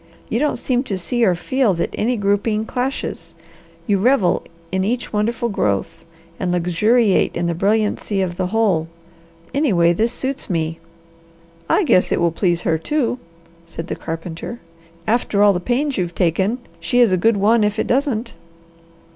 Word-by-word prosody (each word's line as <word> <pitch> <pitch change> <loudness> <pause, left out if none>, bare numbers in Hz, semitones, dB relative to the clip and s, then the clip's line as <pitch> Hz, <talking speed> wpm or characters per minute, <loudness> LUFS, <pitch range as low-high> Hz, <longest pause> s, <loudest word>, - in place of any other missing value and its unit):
You 230 - 0
don't 295 +1 +1
seem 250 -2 0
to 200 -7 -2
see 240 +7 -1
or 185 -5 +4
feel 220 +3 +1
that 170 - -2
any 240 +3 0
grouping 205 +2 0
clashes; 255 +4 -3 0.5
you 205 -4 +1
revel 210 -5 +3 0.3
in 190 0 0
each 235 +3 -2
wonderful 230 +3 0
growth, 105 - -2 0.3
and 180 -2 -1
luxuriate 190 +5 +2
in 170 - -1
the 170 - 0
brilliancy 205 +2 0
of 185 -2 -1
the 185 0 -1
whole. 190 -6 +1 0.7
Anyway, 185 - +3
this 225 +7 +1
suits 265 +2 -4
me." 165 -2 -2 0.9
"I 415 - +3
guess 185 - +3
it - - +2
will 170 -1 +2
please 175 0 0
her, 160 -1 +1
too," 255 - -1 0.5
said 165 0 -7
the - - -2
carpenter. 165 +7 -6 0.5
"After 215 -3 +2
all 205 -1 +6
the 180 - -1
pains 255 +8 -1
you've 175 -1 -2
taken, 190 +6 +1 0.2
she 170 +9 -1
is 235 -5 +5
a - - +4
good 215 +4 +2
one 215 +3 +3
if 210 +1 0
it - - 0
doesn't." 255 -3 0
205 Hz, 165 wpm, -20 LUFS, 175-235 Hz, 0.9 s, all